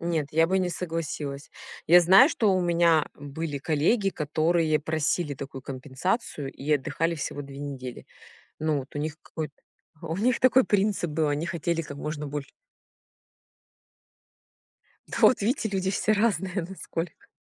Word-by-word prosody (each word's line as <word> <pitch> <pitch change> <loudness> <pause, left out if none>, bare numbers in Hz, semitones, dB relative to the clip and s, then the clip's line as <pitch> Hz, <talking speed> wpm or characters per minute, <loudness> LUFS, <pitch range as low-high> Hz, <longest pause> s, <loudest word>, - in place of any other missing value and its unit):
нет, 165 -3 -1
я 165 +1 +4
бы 190 0 +2
не 180 -1 0
согласилась. 155 -4 -4 0.4
Я 175 +2 +8
знаю, 190 - +7
что 215 -10 +2
у 185 - +2
меня 170 -3 +3
были 145 +1 -5
коллеги, 165 - +2
которые 155 0 +1
просили 155 0 -1
такую 135 -1 -8
компенсацию 140 - -3
и 150 +3 -2
отдыхали 150 +4 0
всего 145 -2 -4
2 140 0 -10
недели. 130 -3 -7 0.5
Ну 155 -2 +1
вот. 135 +1 -9
У - - -3
них 150 0 -3
какой-то 155 -3 -6 0.5
у 165 0 -3
них 245 +3 +2
такой 255 0 +5
принцип 200 -4 +1
был: 155 0 +1
они 145 +3 -1
хотели, 170 -1 -1
как 145 -2 -8
можно 150 0 -4
больше. 145 0 -5 2.6
Да, - - -5
вот 240 - +5
видите, 225 0 0
люди 190 -1 -1
все 215 +2 +1
разные 195 -4 +1
насколько. 175 -3 -6
160 Hz, 150 wpm, -26 LUFS, 145-185 Hz, 2.6 s, Я